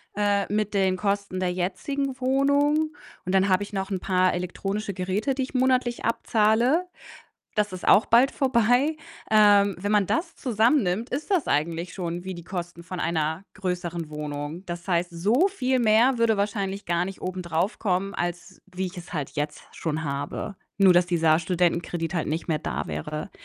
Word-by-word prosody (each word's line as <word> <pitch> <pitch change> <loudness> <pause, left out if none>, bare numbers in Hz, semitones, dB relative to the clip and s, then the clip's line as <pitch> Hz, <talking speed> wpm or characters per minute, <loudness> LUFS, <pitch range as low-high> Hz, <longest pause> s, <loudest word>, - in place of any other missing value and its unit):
äh, 205 -1 +1
mit 210 0 0
den 190 -2 +2
Kosten 200 -1 -2
der 180 -1 +1
jetzigen 255 +10 -2
Wohnung 285 +4 +2 0.3
und 185 +1 0
dann 190 +1 +3
habe 185 +2 +3
ich 205 - -10
noch 195 +1 -3
'n 190 - -1
paar 185 0 +2
elektronische 195 +3 -3
Geräte, 195 +8 -1
die 265 - -1
ich 260 - -7
monatlich 255 -2 +1
abzahle. 230 +9 +2 0.7
Das 210 -2 0
ist 185 - -6
auch 215 - +6
bald 245 +4 +5
vorbei. 255 +4 +2 0.3
Ähm, 205 -3 +5
wenn 205 +2 -2
man 205 -2 +4
das 330 - -1
zusammennimmt, 230 -3 +1
ist 295 +9 -4
das 360 -6 +2
eigentlich 165 +4 -1
schon 175 -1 -4
wie 190 -1 -5
die 170 - -9
Kosten 175 -2 -6
von 180 0 -6
einer 160 +3 -1
größeren 175 -4 -3
Wohnung. 150 +3 -5
Das 175 +2 -6
heißt, 175 0 +1
so 215 - +2
viel 260 -9 0
mehr 235 +3 +4
würde 225 -2 +3
wahrscheinlich 200 -1 -2
gar 170 0 +1
nicht 195 0 -7
obendrauf 180 +1 -2
kommen, 195 0 0
als 175 +1 -4
wie 185 +1 -3
ich 185 - -7
es 175 - -9
halt 150 -5 -3
jetzt 150 0 -4
schon 160 -1 -3
habe. 145 +7 -4 0.2
Nur 190 -2 +6
dass 175 0 +4
dieser 165 -2 +3
Studentenkredit 175 0 -1
halt 170 - -1
nicht 160 +3 -3
mehr 155 -3 0
da 75 +4 -3
wäre. 115 - -5
190 Hz, 175 wpm, -25 LUFS, 175-225 Hz, 0.7 s, auch